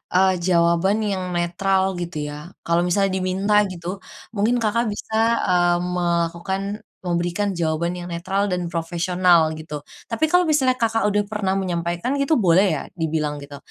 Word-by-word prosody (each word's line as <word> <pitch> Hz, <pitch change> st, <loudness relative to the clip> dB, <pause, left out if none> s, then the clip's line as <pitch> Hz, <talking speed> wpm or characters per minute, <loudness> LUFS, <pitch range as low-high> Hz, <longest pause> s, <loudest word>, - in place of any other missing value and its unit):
eee, 190 Hz, +1 st, +5 dB
jawaban 175 Hz, +4 st, +2 dB
yang 185 Hz, -3 st, -2 dB
netral 190 Hz, +2 st, +1 dB
gitu 170 Hz, -4 st, -4 dB
ya. 150 Hz, +5 st, -10 dB
Kalau 170 Hz, +1 st, +2 dB
misalnya 195 Hz, +2 st, +2 dB
diminta 190 Hz, +3 st, +2 dB
gitu, 180 Hz, +1 st, -6 dB, 0.3 s
mungkin 220 Hz, +3 st, +1 dB
Kakak 230 Hz, +2 st, +1 dB
bisa, 210 Hz, +1 st, -5 dB, 0.3 s
eee, 175 Hz, -1 st, +3 dB
melakukan 175 Hz, +1 st, -1 dB, 0.4 s
memberikan 175 Hz, +3 st, -1 dB
jawaban 170 Hz, +1 st, -1 dB
yang 175 Hz, -, -6 dB
netral 190 Hz, +4 st, -1 dB
dan 180 Hz, -3 st, -2 dB
profesional 170 Hz, 0 st, +2 dB
gitu. 155 Hz, -2 st, -7 dB, 0.2 s
Tapi 300 Hz, +7 st, 0 dB
kalau 360 Hz, +2 st, +4 dB
misalnya 270 Hz, -5 st, +2 dB
Kakak 225 Hz, -1 st, +1 dB
udah 205 Hz, 0 st, +1 dB
pernah 200 Hz, -2 st, -1 dB
menyampaikan 175 Hz, +4 st, -2 dB
gitu 275 Hz, +2 st, +2 dB
boleh 190 Hz, -1 st, +4 dB
ya -, -, -5 dB
dibilang 155 Hz, -3 st, -2 dB
gitu. 140 Hz, 0 st, -9 dB
180 Hz, 150 wpm, -22 LUFS, 170-200 Hz, 0.4 s, eee